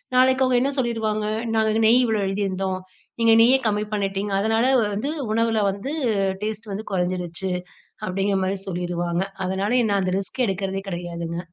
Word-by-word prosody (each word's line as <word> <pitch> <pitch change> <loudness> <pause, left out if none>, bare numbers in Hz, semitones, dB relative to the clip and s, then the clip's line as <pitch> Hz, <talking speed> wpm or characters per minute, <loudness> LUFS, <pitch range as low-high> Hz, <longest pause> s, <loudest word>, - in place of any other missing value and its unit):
நாளைக்கு 260 +1 +5
அவங்க 255 -1 +3
என்ன 275 +2 +1
சொல்லிடுவாங்க, 220 -4 0 0.3
"நாங்க 220 0 +2
நெய் 245 +3 +6
இவ்ளோ 220 -3 +1
எழுதியிருந்தோம், 195 -1 -1 0.4
நீங்க 230 0 +6
நெய்ய 250 +3 +6
கம்மி 210 0 0
பண்ணிட்டீங்க. 195 0 -1
அதனால 225 +3 +2 0.3
வந்து 275 +9 -2 0.2
உணவுல 225 -1 +2
வந்து, 210 +10 -5 0.5
டேஸ்ட் 215 0 -4
வந்து 215 +3 -5
குறைஞ்சிருச்சு" 180 0 -2 0.6
அப்டிங்கற 195 +1 0
மாரி 190 +1 -1
சொல்லிருவாங்க. 175 -1 -1 0.2
அதனால 200 +7 +1
நான் 200 -1 +2
அந்த 185 - -1
ரிஸ்க் 245 +6 -2
எடுக்கிறதே 195 0 -2
கிடையாதுங்க. 170 -1 -4
200 Hz, 145 wpm, -23 LUFS, 185-225 Hz, 0.6 s, நெய்